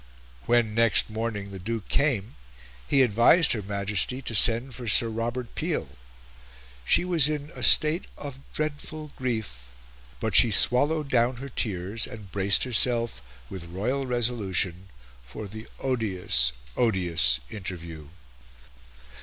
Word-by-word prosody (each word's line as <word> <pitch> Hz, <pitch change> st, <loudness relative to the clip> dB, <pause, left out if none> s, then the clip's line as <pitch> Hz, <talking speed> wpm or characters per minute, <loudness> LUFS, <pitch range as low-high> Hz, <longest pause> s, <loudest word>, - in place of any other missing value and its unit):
When, 120 Hz, -3 st, +2 dB
next 115 Hz, -1 st, +3 dB
morning, 110 Hz, -3 st, -4 dB
the 95 Hz, -, -8 dB
Duke 110 Hz, +3 st, -5 dB
came, 125 Hz, -8 st, 0 dB, 0.5 s
he 135 Hz, -1 st, +4 dB
advised 125 Hz, -, +4 dB
her 110 Hz, -, -1 dB
Majesty 100 Hz, +4 st, -2 dB
to 120 Hz, -, -5 dB
send 120 Hz, +4 st, +3 dB
for 120 Hz, 0 st, -8 dB
Sir 115 Hz, +2 st, +4 dB
Robert 115 Hz, +2 st, -4 dB
Peel. 155 Hz, -, -3 dB, 0.9 s
She 120 Hz, -, +3 dB
was 165 Hz, -5 st, +3 dB
in 150 Hz, 0 st, -4 dB
"a -, -, -10 dB
state 155 Hz, +4 st, +4 dB
of 140 Hz, -2 st, -8 dB
dreadful 155 Hz, 0 st, -5 dB
grief," 110 Hz, -, -5 dB, 0.5 s
but -, -, -2 dB
she 120 Hz, -, +7 dB
swallowed 145 Hz, +8 st, +3 dB
down 120 Hz, 0 st, +2 dB
her 135 Hz, +3 st, -8 dB
tears, 105 Hz, -2 st, -3 dB
and 105 Hz, -5 st, -11 dB
braced 100 Hz, 0 st, +3 dB
herself, 120 Hz, -, 0 dB, 0.3 s
with 90 Hz, +4 st, -8 dB
royal 120 Hz, +11 st, -3 dB
resolution, 100 Hz, -7 st, -1 dB, 0.3 s
for 60 Hz, -, -9 dB
the 110 Hz, +3 st, -10 dB
odious, 95 Hz, -, +1 dB, 0.2 s
odious 85 Hz, -, +2 dB
interview. 85 Hz, -6 st, -8 dB
115 Hz, 130 wpm, -26 LUFS, 95-130 Hz, 0.9 s, she